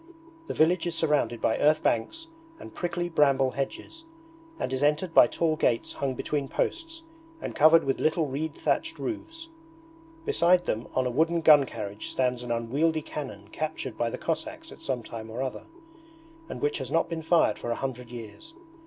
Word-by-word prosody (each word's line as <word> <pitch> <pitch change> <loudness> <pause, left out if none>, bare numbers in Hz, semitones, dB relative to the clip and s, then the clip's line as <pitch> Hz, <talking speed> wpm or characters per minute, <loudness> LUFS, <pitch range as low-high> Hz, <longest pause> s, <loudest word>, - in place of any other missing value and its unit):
The - - -4
village 170 +2 +3
is 170 - -2
surrounded 150 -7 +1
by 110 - +1
earth 155 +1 +3
banks 225 - 0 0.3
and - - -11
prickly 175 -1 -2
bramble 140 -5 +3
hedges, 235 - -5 0.5
and 130 - -3
is 130 - -1
entered 150 +4 +1
by - - +8
tall 160 0 0
gates 120 -6 0
hung 135 -2 -2
between 145 +2 -2
posts 330 - -3 0.4
and - - -5
covered 160 +2 +6
with 135 - -1
little 160 +1 +2
reed 150 +3 -3
thatched - - -1
roofs. 330 -1 -6 0.8
Beside 175 +2 +3
them 110 +2 -2
on 130 - +2
a 125 - 0
wooden 165 +6 +2
gun 150 -4 +7
carriage 105 -1 -6
stands 125 -1 0
an 120 -1 -5
unwieldy 145 +8 0
cannon 105 -12 -7
captured 155 -6 -4
by 120 +1 0
the - - -5
Cossacks 315 - -4
at - - -13
some 130 -3 -2
time 110 0 -8
or 120 +4 -3
other, 130 - -5 0.8
and - - -6
which 145 +1 0
has 130 -2 -5
not 165 +3 +2
been 165 -1 -4
fired 160 -10 +3
for - - -5
a 115 - 0
hundred 125 -2 -5
years. 120 - -10
150 Hz, 180 wpm, -27 LUFS, 125-165 Hz, 0.8 s, by